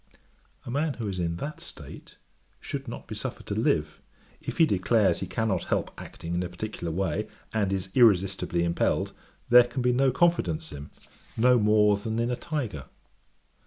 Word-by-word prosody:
A - - -5
man 145 +2 0
who 115 -3 -4
is 95 -2 -3
in 85 -1 -1
that 145 - -6
state, - - -10 0.4
should 135 -1 -5
not 120 - -7
be - - -6
suffered - - -4
to - - -3
live; 75 0 0 0.4
if - - -6
he 165 - +6
declares 105 -2 +2
he 95 - -4
cannot 110 -3 -1
help - - -1
acting 85 +1 -7
in 90 - 0
a 90 - -3
particular 90 -2 -5
way, 85 -2 -1 0.3
and 105 -3 +1
is 95 -1 -3
irresistibly 95 -6 +3
impelled, 85 0 0 0.4
there 120 0 +8
can 120 +1 -4
be 125 0 +3
no 135 +2 +3
confidence 105 - +1
in 75 - -7
him, - - -17 0.5
no 125 +2 +5
more 105 -1 +4
than 110 +2 -4
in 120 +1 0
a - - 0
tyger. 120 - -4
105 Hz, 180 wpm, -27 LUFS, 90-125 Hz, 0.5 s, there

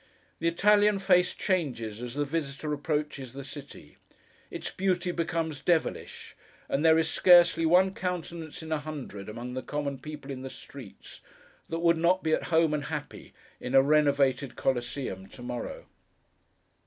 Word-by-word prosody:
The 165 - 0
Italian 205 +4 +4
face 180 -2 +3
changes 120 - -2
as 125 0 -6
the 145 0 0
visitor 150 0 -3
approaches 150 -4 -3
the 140 0 -7
city; 135 - -11 0.5
its - - -5
beauty 185 -2 0
becomes 165 -3 -2
devilish; 170 0 -1 0.3
and 140 - 0
there 160 0 +6
is 165 - +2
scarcely 175 -2 +5
one 185 +3 +4
countenance 170 -4 -5
in 160 - -8
a 155 - +1
hundred, 140 -10 -7
among 120 +3 -6
the 130 - -3
common 140 -2 -3
people 150 -2 -8
in 130 -1 -6
the 130 - -6
streets, 130 -5 -12 0.5
that 165 0 -3
would 170 -1 +4
not 175 +3 +2
be 160 - +1
at - - 0
home 165 -2 +3
and 145 -2 -2
happy - - -7 0.2
in 125 +2 -3
a 135 - +8
renovated 140 -3 +2
Coliseum 120 -6 -2
to 125 +5 -12
morrow. 125 -1 -5
150 Hz, 155 wpm, -28 LUFS, 135-170 Hz, 0.5 s, a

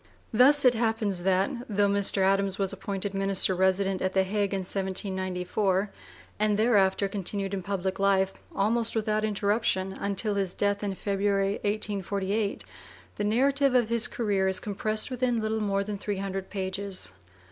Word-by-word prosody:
Thus 270 +5 +6
it 250 - +7
happens 220 -5 -1
that, 190 +6 +2 0.2
though 205 -1 +2
Mr. 200 -1 +3
Adams 195 0 +1
was 195 -1 -1
appointed 195 0 -4
minister 195 -1 +2
resident 190 +1 +1
at 185 0 -1
the 190 - +3
Hague 200 +1 -1
in 195 -1 -1
1794, 190 +1 -2 0.5
and 210 -1 +2
thereafter 200 -3 +3
continued 195 0 -3
in 195 - -2
public 190 0 -3
life, 195 -1 +2 0.2
almost 225 +3 +1
without 215 -1 0
interruption, 205 -2 0
until 200 +2 -2
his 195 -2 -2
death 205 0 0
in 205 - -1
(p. - - -10
vi) - - -19
February, 200 0 +1
1848, 205 0 -1 0.5
the 205 - -2
narrative 270 +5 +2
of 240 -3 +3
his 235 0 +2
career 200 -5 0
is 190 -1 +1
compressed 215 +3 -1
within 250 -2 0
little 220 0 -1
more 200 -1 0
than 205 0 -5
three 205 0 -3
hundred 195 0 -4
pages. 190 - -4
200 Hz, 160 wpm, -27 LUFS, 190-215 Hz, 0.5 s, it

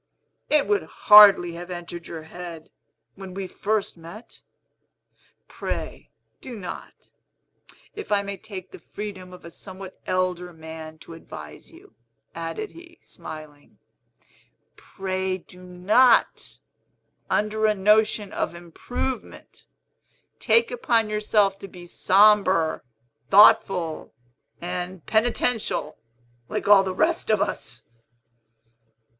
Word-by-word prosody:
It 300 -2 +3
would 415 -1 +1
hardly 205 -5 +7
have 175 +2 -9
entered 175 -1 -7
your 160 -2 -8
head, 165 -1 -10 0.4
when 190 -1 -10
we 195 -1 -4
first 210 +2 -2
met. 170 +8 -13 1.1
Pray - - -6 0.3
do 245 -3 -8
not, 180 -4 -10 0.8
if 420 - -8
I 200 -1 +2
may 200 0 -5
take 190 -1 -10
the - - -11
freedom 185 +1 -8
of 180 - -13
a 170 - -10
somewhat 190 +1 -10
elder 180 -1 -1
man 160 0 -10
to - - -11
advise 75 - -11
you," - - -18 0.4
added 165 - -5
he, 340 0 -15
smiling, 150 -2 -12 1.0
"pray 190 -1 -4
do 180 0 -17
not, 185 +8 +2 0.7
under 215 +1 +1
a 215 - +2
notion 210 +1 +2
of 170 - -3
improvement, 210 +9 -6 0.7
take 465 0 +3
upon 230 - +1
yourself 210 -2 +1
to 195 - -9
be 180 -2 -12
sombre, 190 -3 +3 0.5
thoughtful, 190 -5 +4 0.4
and 180 0 -5
penitential, 230 0 0 0.5
like - - -3
all 205 -1 +8
the 190 - -3
rest 320 - 0
of 215 -2 +3
us." 120 -10 -4
190 Hz, 110 wpm, -24 LUFS, 175-215 Hz, 1.1 s, all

